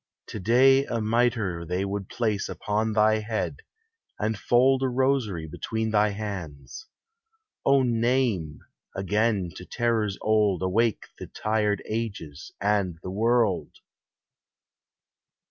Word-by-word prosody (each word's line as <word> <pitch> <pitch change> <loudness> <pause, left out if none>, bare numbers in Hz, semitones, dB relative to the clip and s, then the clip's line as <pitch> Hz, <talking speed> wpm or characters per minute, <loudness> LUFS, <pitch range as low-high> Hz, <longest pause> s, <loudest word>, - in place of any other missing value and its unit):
To 110 - -5
day 130 +7 +5
a 120 -3 -2
mitre 110 -6 0
they 90 +3 -2
would 100 -1 -4
place 110 -4 -1
upon 110 +1 -1
Thy 110 0 +3
head, 110 0 -3 0.6
and 110 +1 -1
fold 130 +6 +3
a 135 - +2
rosary 125 -9 0
between 110 +8 -3
Thy 105 0 +3
hands. 100 - -7 0.8
O 135 -1 +5
name! 115 - 0 0.3
again 100 -1 0
to - - -8
terrors 110 -1 -1
old 105 -4 +2
Awake 110 +4 +1
the - - -7
tired 105 -1 -1
ages 100 -9 -5
and. 100 -4 0
the 90 - -5
world 110 -1 +1
110 Hz, 115 wpm, -26 LUFS, 95-115 Hz, 0.8 s, day